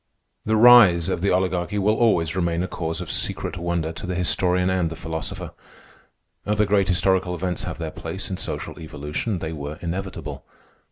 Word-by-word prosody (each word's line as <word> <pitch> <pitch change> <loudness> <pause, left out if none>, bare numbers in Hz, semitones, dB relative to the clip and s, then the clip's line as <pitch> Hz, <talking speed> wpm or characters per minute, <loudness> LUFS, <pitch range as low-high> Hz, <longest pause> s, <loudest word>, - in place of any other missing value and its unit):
The 110 - +2
rise 110 -7 +7
of 90 -2 -1
the 100 - +2
Oligarchy 90 +1 0
will 105 +2 +3
always 90 -8 +2
remain 85 -1 0
a - - -2
cause 80 -2 -4
of - - -5
secret - - -1
wonder 85 -2 -2
to 85 - -7
the 90 - -2
historian 90 +1 +1
and 90 -3 +1
the 80 - -7
philosopher. 80 0 -5 0.9
Other 105 0 +1
great 100 -1 +2
historical 90 0 +1
events 90 0 -3
have - - -5
their - - -4
place - - -5
in - - -3
social - - -5
evolution. 75 +6 -4
They 80 -1 -4
were 75 0 -6
inevitable. 90 +3 -5
90 Hz, 175 wpm, -23 LUFS, 85-95 Hz, 0.9 s, rise